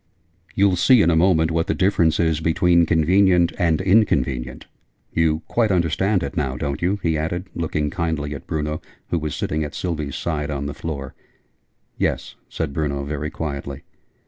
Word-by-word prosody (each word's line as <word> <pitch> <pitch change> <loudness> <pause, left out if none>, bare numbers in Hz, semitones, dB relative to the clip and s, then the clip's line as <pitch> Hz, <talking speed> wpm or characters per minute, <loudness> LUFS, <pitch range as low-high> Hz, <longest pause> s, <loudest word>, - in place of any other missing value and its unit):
You'll 100 -2 +3
see 120 +4 +5
in 85 - +3
a - - +3
moment 80 -1 +3
what 85 +3 0
the 100 - 0
difference 85 -5 +2
is 80 -2 +2
between 85 +1 +3
'convenient' 90 +2 +3
and 80 -3 +2
'inconvenient.' 70 - +1 0.5
You 80 -1 +1
quite 115 -2 +1
understand 90 +2 +1
it - - -5
now, 65 -5 -1
don't 70 +1 -3
you?" 95 +4 0
he 80 -2 +1
added, 85 +4 -3
looking 75 -3 -2
kindly 80 -5 -2
at 70 - -9
Bruno, 75 0 -2 0.3
who 85 - +1
was 75 -1 -4
sitting, 80 +1 -2
at 75 +1 -6
Sylvie's 75 -6 -3
side, 75 -3 -2
on 70 -1 -3
the 70 - -4
floor. 70 -4 -6 0.9
"Yes," - - -1 0.2
said 80 -4 -3
Bruno, 70 -3 -2
very 75 +1 -3
quietly. 70 -3 -5
80 Hz, 170 wpm, -22 LUFS, 75-90 Hz, 0.9 s, see